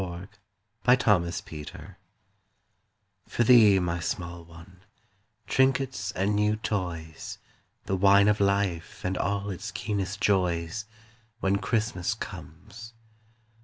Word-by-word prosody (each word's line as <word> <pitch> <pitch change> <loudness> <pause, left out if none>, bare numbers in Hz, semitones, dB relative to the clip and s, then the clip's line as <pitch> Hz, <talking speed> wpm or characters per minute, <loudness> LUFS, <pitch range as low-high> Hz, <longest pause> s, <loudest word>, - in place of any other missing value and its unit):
WHEN 90 +1 -6 0.5
CHRISTMAS 105 -9 +3
COMES 75 -2 -9 1.4
For 120 - 0
thee, 110 -5 +7
my 85 -2 -1
small 85 0 -4
one 85 +2 -15 0.6
trinkets 130 -4 +1
and 100 +3 0
new 105 +1 +2
toys, 85 -7 -4 0.5
The 95 - -1
wine 100 +1 +5
of 105 0 +3
life 100 -5 0
and 95 +1 0
all 100 +2 -1
its 95 +4 -6
keenest 100 -1 -3
joys, 90 0 0 0.5
When 95 -1 +1
Christmas 105 -2 -1
comes. 105 +8 -10
95 Hz, 105 wpm, -27 LUFS, 85-105 Hz, 1.4 s, thee